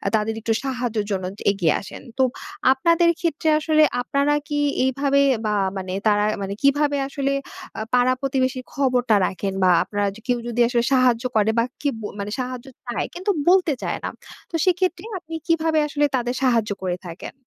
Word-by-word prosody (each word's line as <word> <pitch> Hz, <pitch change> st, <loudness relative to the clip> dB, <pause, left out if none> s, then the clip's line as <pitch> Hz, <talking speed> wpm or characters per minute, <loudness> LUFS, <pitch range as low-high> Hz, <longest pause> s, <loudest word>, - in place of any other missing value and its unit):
তাদের 220 Hz, +1 st, 0 dB
একটু 225 Hz, 0 st, 0 dB
সাহায্যের 245 Hz, -5 st, -2 dB
জন্য 190 Hz, -1 st, -1 dB, 0.3 s
এগিয়ে 175 Hz, -6 st, +1 dB
আসেন। 195 Hz, -, -10 dB, 0.2 s
তো, 265 Hz, -, +4 dB, 0.5 s
আপনাদের 335 Hz, +5 st, +3 dB
ক্ষেত্রে 320 Hz, -2 st, 0 dB
আসলে 310 Hz, 0 st, +3 dB, 0.2 s
আপনারা 280 Hz, +3 st, +1 dB
কি, 295 Hz, -1 st, -1 dB, 0.2 s
এইভাবে 275 Hz, +1 st, +2 dB, 0.2 s
বা 210 Hz, -, +1 dB, 0.2 s
মানে, 185 Hz, -1 st, -4 dB
তারা 205 Hz, 0 st, +3 dB, 0.2 s
মানে 195 Hz, 0 st, -3 dB
কিভাবে 285 Hz, +1 st, +3 dB
আসলে, 275 Hz, 0 st, -1 dB, 0.5 s
আ -, -, -2 dB
পাড়া 250 Hz, +1 st, +4 dB
প্রতিবেশীর 260 Hz, -1 st, -1 dB
খবরটা 250 Hz, -5 st, +2 dB
রাখেন 195 Hz, 0 st, -3 dB
বা 185 Hz, -, +5 dB
আপনারা 205 Hz, -1 st, -2 dB, 0.2 s
কেউ 245 Hz, -1 st, +2 dB
যদি 240 Hz, 0 st, -3 dB
আসলে 240 Hz, -1 st, +1 dB
সাহায্য 250 Hz, -2 st, +3 dB
করে 215 Hz, 0 st, +3 dB
বা -, -, +4 dB, 0.2 s
কি 290 Hz, -, +1 dB, 0.5 s
সাহায্য 255 Hz, 0 st, -4 dB, 0.2 s
চায়, 240 Hz, -, -2 dB
কিন্তু 375 Hz, +3 st, -1 dB, 0.2 s
বলতে 360 Hz, -5 st, +4 dB
চায় -, -, -2 dB
না। -, -, -2 dB, 0.4 s
তো 335 Hz, -, -5 dB
সেক্ষেত্রে, 365 Hz, -1 st, +1 dB, 0.2 s
আপনি 325 Hz, -1 st, -8 dB
কিভাবে 320 Hz, -1 st, +2 dB
আসলে 290 Hz, 0 st, +1 dB
তাদের 245 Hz, 0 st, -1 dB
সাহায্য 230 Hz, -5 st, +2 dB
করে 180 Hz, -1 st, -1 dB
থাকেন? 165 Hz, -, -8 dB
255 Hz, 165 wpm, -22 LUFS, 225-295 Hz, 0.5 s, বা